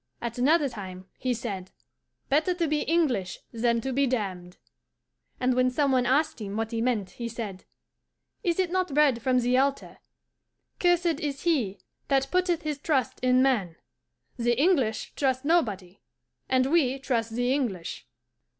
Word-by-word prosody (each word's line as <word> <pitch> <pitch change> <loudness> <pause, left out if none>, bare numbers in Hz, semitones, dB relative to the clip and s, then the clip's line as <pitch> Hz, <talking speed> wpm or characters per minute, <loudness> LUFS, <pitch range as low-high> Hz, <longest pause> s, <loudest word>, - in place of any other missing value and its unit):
At 235 0 -5
another 295 +3 +4
time 190 -6 -8
he 255 - -1
said, 205 -6 -4 0.6
"Better 315 +6 +2
to 340 -2 0
be 305 0 +1
English 265 - 0
than 235 0 +1
to 265 +2 -3
be 275 +2 +2
damned." 185 -7 -3 0.8
And 255 0 +2
when 255 0 +3
some 280 +2 +1
one 250 -2 +2
asked 285 0 +1
him 205 0 -4
what 225 0 -2
he 230 -1 -1
meant, 225 -6 0
he 235 -1 -5
said, 210 -5 -6 0.8
"Is 345 -5 0
it 370 -2 0
not 365 -6 -1
read 275 -6 +4
from 255 +1 +2
the 250 +1 +3
altar, 275 +1 -1 0.8
'Cursed 350 -3 +2
is 285 -1 -4
he 250 - +1 0.3
that 270 0 +1
putteth 360 -2 +1
his 300 -2 -3
trust 275 -6 0
in 255 0 +4
man'? 210 -11 +1 0.6
The 240 0 +1
English 275 -10 +1
trust 260 -1 0
nobody, 205 - 0 0.5
and 260 +1 +2
we 275 -6 +3
trust 235 -5 -2
the 245 +2 +1
English." 220 -12 -3
255 Hz, 160 wpm, -27 LUFS, 225-295 Hz, 0.8 s, another